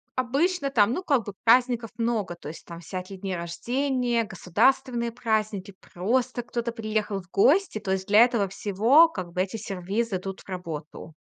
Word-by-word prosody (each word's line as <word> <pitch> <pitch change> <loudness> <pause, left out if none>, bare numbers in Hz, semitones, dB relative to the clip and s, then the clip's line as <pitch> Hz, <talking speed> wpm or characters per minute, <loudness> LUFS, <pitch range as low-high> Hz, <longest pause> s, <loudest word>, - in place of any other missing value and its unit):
обычно 280 +5 0
там, 225 -4 +3
ну, 360 - -2
как 280 -9 +2
бы, 205 - -6
праздников 240 -1 +3
много. 230 -6 -1
То 150 - -9
есть 160 - -10
там 170 -1 -9
всякие 185 +2 -7
дни 190 -1 -4
рождения, 240 +8 -1
государственные 235 +5 +1
праздники, 215 -4 -2 0.2
просто 245 +7 0
кто-то 235 0 -3
приехал 215 -3 -2
в 180 - -22
гости. 285 - +3
То 190 - -4
есть 190 0 -1
для 210 +1 +5
этого 235 -5 +1
всего, 215 - +4
как 185 - -6
бы, 180 - 0
эти 190 +4 -3
сервизы 200 +1 -2
идут 195 +1 -7
в - - -21
работу. 165 -3 -7
215 Hz, 170 wpm, -26 LUFS, 190-245 Hz, 0.2 s, для